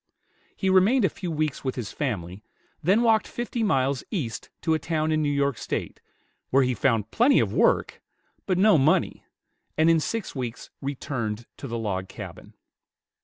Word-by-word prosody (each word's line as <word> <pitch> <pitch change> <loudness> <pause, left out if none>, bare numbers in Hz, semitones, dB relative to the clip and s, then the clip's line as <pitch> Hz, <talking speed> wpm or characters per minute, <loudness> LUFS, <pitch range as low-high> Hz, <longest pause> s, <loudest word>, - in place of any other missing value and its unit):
He 190 - -2
remained 195 +6 +4
a - - +3
few 180 +3 -6
weeks 155 -2 -2
with 130 -2 -2
his 120 -5 -5
family, 100 - -4 0.4
then 195 +8 +3
walked 225 -2 +3
fifty 240 0 -4
miles 135 - +1
east 135 - -4
to 160 - +2
a 160 - +1
town 155 0 -1
in 155 0 +2
New 150 - +1
York 140 -2 0
State, - - -4 0.5
where 135 +1 +4
he 125 0 +1
found 115 -2 +1
plenty 265 +4 +4
of - - 0
work, - - +2 0.5
but 185 -2 +1
no 200 -3 +5
money, 140 +4 +2 0.5
and 160 +1 +5
in 165 - +4
six 220 +8 -3
weeks 125 -4 -6
returned 120 -5 -3
to 140 - -7
the 115 -1 -3
log 95 -4 -2
cabin. - - -10
145 Hz, 170 wpm, -25 LUFS, 125-185 Hz, 0.5 s, no